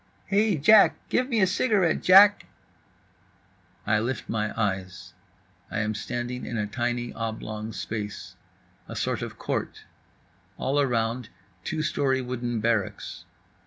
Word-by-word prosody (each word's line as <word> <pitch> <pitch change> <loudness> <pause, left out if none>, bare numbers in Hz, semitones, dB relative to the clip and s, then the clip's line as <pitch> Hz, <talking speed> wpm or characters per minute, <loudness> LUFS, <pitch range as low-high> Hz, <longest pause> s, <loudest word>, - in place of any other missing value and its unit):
"Hey, 205 -2 +2
Jack, 210 +9 +6
give 255 +1 +1
me 230 -4 +1
a - - +6
cigarette, 195 -2 +1
Jack…." 200 +2 +7 1.4
I 105 +1 +2
lift 120 +4 -3
my 105 -1 -1
eyes. 95 -3 -3 0.6
I 110 - -2
am 105 +1 -1
standing 120 +3 -4
in 120 - -4
a 105 - 0
tiny 120 +2 -2
oblong 110 -1 -5
space. 105 -2 -6 0.5
A - - -8
sort - - -1
of - - -6
court. - - -4 0.7
All 140 +2 0
around, 120 -2 -1 0.3
two 155 -1 -2
story 140 -2 +1
wooden 120 -2 -3
barracks. 110 -3 -2
120 Hz, 125 wpm, -26 LUFS, 110-155 Hz, 1.4 s, Jack